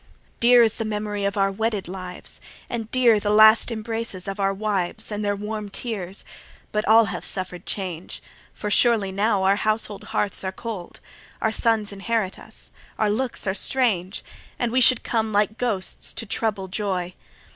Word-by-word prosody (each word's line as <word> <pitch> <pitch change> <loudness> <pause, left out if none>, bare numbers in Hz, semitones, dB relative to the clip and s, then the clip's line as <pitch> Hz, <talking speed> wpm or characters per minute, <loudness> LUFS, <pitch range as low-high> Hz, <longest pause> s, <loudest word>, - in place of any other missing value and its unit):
6 - - -32 0.3
Dear 240 0 +7
is 225 -1 +1
the 225 - -1
memory 210 -1 -2
of 200 +1 -1
our 195 0 +2
wedded 215 -1 -2
lives, 185 0 -7 0.3
And 225 -2 -3
dear 240 -4 +4
the 205 - -2
last 215 +2 +7
embraces 225 -4 -4
of 195 +1 -4
our 195 0 +2
wives 195 -2 -2
And 210 0 -3
their 205 0 0
warm 210 0 -5
tears: 195 -4 -5 0.5
but 210 0 -1
all 225 +1 +7
hath 180 -3 -5
suffer'd 185 -2 -3
change; 185 -4 -5 0.3
For 210 - -5
surely 215 -3 +4
now 200 0 +1
our 195 +1 +4
household 215 -1 -1
hearths 210 -2 -1
are 190 - -2
cold: 200 -3 -7 0.4
Our 220 - +1
sons 220 -2 +1
inherit 200 -1 -2
us: - - -13 0.3
our 215 -1 +2
looks 245 +2 -2
are 190 - +1
strange: 205 -4 +1 0.3
And 240 -2 -1
we 255 +2 +3
should 255 -1 +5
come 220 -2 0
like 210 +1 +1
ghosts 215 -7 -2
to 225 - -4
trouble 205 -2 -1
joy. 185 -3 -2
210 Hz, 175 wpm, -24 LUFS, 195-225 Hz, 0.5 s, Dear